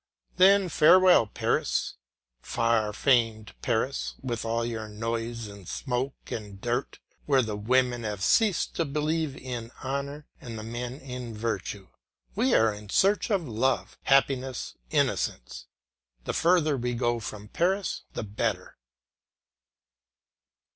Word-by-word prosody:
Then 195 Hz, +1 st, +6 dB
farewell 175 Hz, -4 st, +6 dB
Paris, -, -, 0 dB, 0.5 s
far 115 Hz, -, +1 dB
famed 115 Hz, -2 st, +1 dB
Paris, 125 Hz, +2 st, -1 dB
with 120 Hz, -3 st, -3 dB
all 115 Hz, +1 st, -1 dB
your 110 Hz, -2 st, -4 dB
noise 115 Hz, +2 st, -3 dB
and 100 Hz, -3 st, -11 dB
smoke 130 Hz, +4 st, -3 dB
and 105 Hz, -3 st, -6 dB
dirt, 120 Hz, +4 st, -2 dB, 0.3 s
where 135 Hz, -3 st, +4 dB
the 110 Hz, -2 st, -3 dB
women 120 Hz, +3 st, +1 dB
have 105 Hz, -3 st, -3 dB
ceased 210 Hz, -, +3 dB
to 165 Hz, -, +1 dB
believe 150 Hz, 0 st, -1 dB
in 120 Hz, -3 st, -6 dB
honour 140 Hz, +2 st, -4 dB, 0.2 s
and 115 Hz, -4 st, -7 dB
the 110 Hz, -, -6 dB
men 120 Hz, +2 st, -5 dB
in 125 Hz, -4 st, -7 dB
virtue. 105 Hz, -3 st, -3 dB, 0.5 s
We 240 Hz, +5 st, +2 dB
are 110 Hz, -1 st, +4 dB
in 105 Hz, 0 st, -11 dB
search 200 Hz, -, +3 dB
of 190 Hz, -7 st, 0 dB
love, 120 Hz, +3 st, 0 dB
happiness, 135 Hz, -2 st, +2 dB, 0.2 s
innocence; -, -, -1 dB, 0.6 s
the -, -, -3 dB
further 165 Hz, -4 st, +3 dB
we 120 Hz, 0 st, -2 dB
go 120 Hz, 0 st, 0 dB
from 105 Hz, -1 st, -7 dB
Paris 190 Hz, -, 0 dB
the -, -, -4 dB
better. 105 Hz, -, -3 dB
120 Hz, 125 wpm, -27 LUFS, 110-140 Hz, 0.6 s, Then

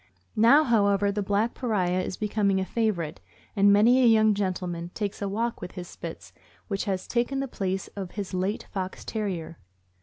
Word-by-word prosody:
Now, 235 Hz, +8 st, +6 dB
how 225 Hz, -7 st, +3 dB
ever, 200 Hz, 0 st, +2 dB
the 205 Hz, +1 st, -2 dB
black 205 Hz, +4 st, 0 dB
pariah 185 Hz, -7 st, 0 dB
is 185 Hz, -, -4 dB
becoming 205 Hz, -2 st, +1 dB
a 190 Hz, -, -1 dB
favorite, 185 Hz, -8 st, -1 dB, 0.3 s
and 200 Hz, 0 st, +5 dB
many 230 Hz, +6 st, +5 dB
a 250 Hz, -, +6 dB
young 220 Hz, -1 st, +5 dB
gentleman 180 Hz, -3 st, -3 dB
takes 205 Hz, -1 st, -3 dB
a 200 Hz, -, -1 dB
walk 230 Hz, +4 st, -2 dB
with 180 Hz, -, -7 dB
his 180 Hz, -2 st, -7 dB
Spits, -, -, -9 dB, 0.3 s
which 195 Hz, -2 st, -2 dB
has 190 Hz, -3 st, -2 dB
taken 245 Hz, +3 st, -1 dB
the 275 Hz, -, -2 dB
place 190 Hz, -5 st, -3 dB
of 195 Hz, -3 st, -6 dB
his 200 Hz, -3 st, -5 dB
late 190 Hz, +4 st, -1 dB
Fox 190 Hz, -2 st, -4 dB
Terrier. 185 Hz, -7 st, -4 dB
200 Hz, 185 wpm, -26 LUFS, 185-220 Hz, 0.3 s, Now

